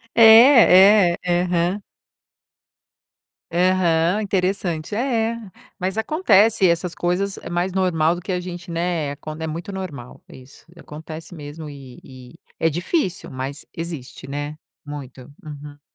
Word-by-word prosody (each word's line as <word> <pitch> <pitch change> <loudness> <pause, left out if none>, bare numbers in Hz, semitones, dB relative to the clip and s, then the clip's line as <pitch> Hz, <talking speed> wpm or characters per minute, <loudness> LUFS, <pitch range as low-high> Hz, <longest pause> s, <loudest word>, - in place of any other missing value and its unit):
É, 215 -6 +7
é, - - -15
aham. 175 +2 0 1.7
Aham, 180 +1 +2
interessante, 185 -3 -2
é 225 - -1 0.3
é. - - -6 0.4
Mas 190 +4 -3
acontece, 220 - +3
essas 170 0 0
coisas 185 +3 -1
é - - -9
mais 175 +2 -1
normal 175 -3 +1
do 175 - -7
que 190 - -8
a 180 - 0
gente, 175 0 -8
né, 165 -4 -2
quando 155 +2 -8
é - - -2
muito 170 +5 -6
normal 150 -11 -8
isso, 130 +1 -15
acontece 160 +1 -10
mesmo 150 0 -9
e 135 -3 -12
e 130 +4 -14 0.2
é 165 - +2
difícil, 185 - -2
mas 135 +2 -6
existe, 155 -5 -7
né, 145 +2 -5 0.3
muito. 135 -3 -9 0.2
Uhum. 145 -1 -10
175 Hz, 130 wpm, -21 LUFS, 150-190 Hz, 1.7 s, É